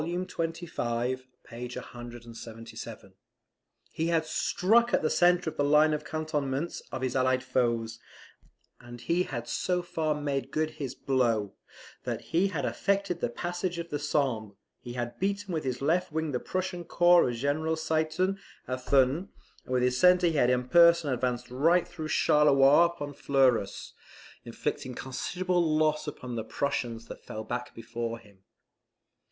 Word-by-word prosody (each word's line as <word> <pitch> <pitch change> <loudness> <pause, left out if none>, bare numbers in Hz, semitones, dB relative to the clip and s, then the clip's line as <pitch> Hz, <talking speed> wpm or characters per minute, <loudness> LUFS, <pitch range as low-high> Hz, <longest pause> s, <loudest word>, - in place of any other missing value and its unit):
xxv. 165 -8 -2 0.2
p. 120 +1 -7
177.] 120 -2 -9 0.8
he 160 - -1
had 165 -2 +1
struck 230 +9 +2
at - - 0
the 155 - +1
centre 175 0 +3
of 160 - -3
the 145 - +2
line 150 +2 +5
of 150 0 -2
cantonments 155 -1 -2
of 130 - -4
his 130 - -1
allied 130 0 +2
foes; 115 -3 0 0.8
and 120 0 -11
he 170 +7 +1
had 120 -9 -4
so 180 +9 -1
far 160 -4 -1
made 140 -3 -2
good 155 +2 -1
his 140 -4 -6
blow, 115 -7 0 0.5
that - - -3
he 180 +4 +4
had 160 -7 -2
affected 200 -3 0
the - - -1
passage 175 +6 -3
of 170 0 -6
the 145 - -1
Sambre, 130 -8 -1 0.2
he 120 - -8
had 120 -1 -4
beaten 200 0 -1
with 160 - -1
his 130 -1 -3
left 175 +5 +1
wing 160 0 -1
the 125 - -1
Prussian 185 +1 -3
corps 175 -3 +5
of 120 - -3
General 150 +6 0
Ziethen 160 +4 0 0.3
at 130 0 -4
Thuin, 140 +8 +2 0.4
and - - -10
with 125 - +2
his 125 0 +1
centre 180 +2 +6
he 165 - +2
had 130 -5 +3
in 125 0 +1
person 170 -1 +5
advanced 125 0 -2
right 165 +7 +3
through 160 -3 -6
Charleroi 150 0 +5
upon 150 -4 -6
Fleurus, 130 -7 +1 0.5
inflicting 125 +2 -4
considerable 180 +8 -1
loss 155 -1 +1
upon 125 -4 -6
the 110 - -2
Prussians 120 -5 -2
that - - -10
fell 110 - -6
back 120 +2 -5
before 115 0 -4
him. 105 -4 -20
145 Hz, 155 wpm, -29 LUFS, 125-170 Hz, 0.8 s, centre